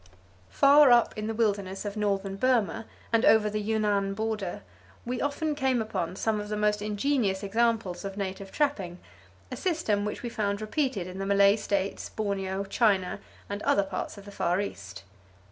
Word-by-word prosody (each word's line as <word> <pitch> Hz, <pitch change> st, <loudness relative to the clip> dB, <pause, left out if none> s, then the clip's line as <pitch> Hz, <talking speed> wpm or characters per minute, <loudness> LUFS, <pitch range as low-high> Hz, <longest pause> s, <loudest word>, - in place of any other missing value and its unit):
Far 285 Hz, 0 st, +6 dB
up 240 Hz, -1 st, +4 dB
in 215 Hz, 0 st, -4 dB
the 225 Hz, -, -2 dB
wilderness 200 Hz, -3 st, -1 dB
of 205 Hz, 0 st, -4 dB
northern 200 Hz, -2 st, -1 dB
Burma, 225 Hz, -1 st, +1 dB, 0.3 s
and 230 Hz, -, +4 dB
over 215 Hz, -1 st, +5 dB
the 210 Hz, 0 st, -2 dB
Yunnan 205 Hz, -2 st, 0 dB
border, 215 Hz, -, -3 dB, 0.4 s
we 245 Hz, +1 st, -3 dB
often 295 Hz, +2 st, -1 dB
came 265 Hz, -4 st, +1 dB
upon 185 Hz, -6 st, -3 dB
some 215 Hz, +1 st, 0 dB
of 210 Hz, -, -7 dB
the 210 Hz, -, -2 dB
most 210 Hz, 0 st, +1 dB
ingenious 210 Hz, -1 st, 0 dB
examples 220 Hz, -3 st, 0 dB
of 195 Hz, 0 st, -6 dB
native 195 Hz, 0 st, -5 dB
trapping, 200 Hz, -, -1 dB, 0.5 s
a -, -, -3 dB
system 310 Hz, -, 0 dB
which 210 Hz, +3 st, -4 dB
we 240 Hz, -, -3 dB
found 200 Hz, -3 st, -1 dB
repeated 220 Hz, -, -1 dB
in 185 Hz, +1 st, -8 dB
the 195 Hz, -, -2 dB
Malay 200 Hz, 0 st, +5 dB
States, 200 Hz, -2 st, -2 dB
Borneo, 195 Hz, -2 st, -2 dB
China 200 Hz, -2 st, +1 dB, 0.3 s
and 205 Hz, +1 st, -5 dB
other 200 Hz, -, +3 dB
parts 195 Hz, +2 st, -5 dB
of 200 Hz, -, -11 dB
the 205 Hz, -, -10 dB
Far 180 Hz, -2 st, 0 dB
East. 95 Hz, -, -6 dB
210 Hz, 175 wpm, -28 LUFS, 195-225 Hz, 0.5 s, Far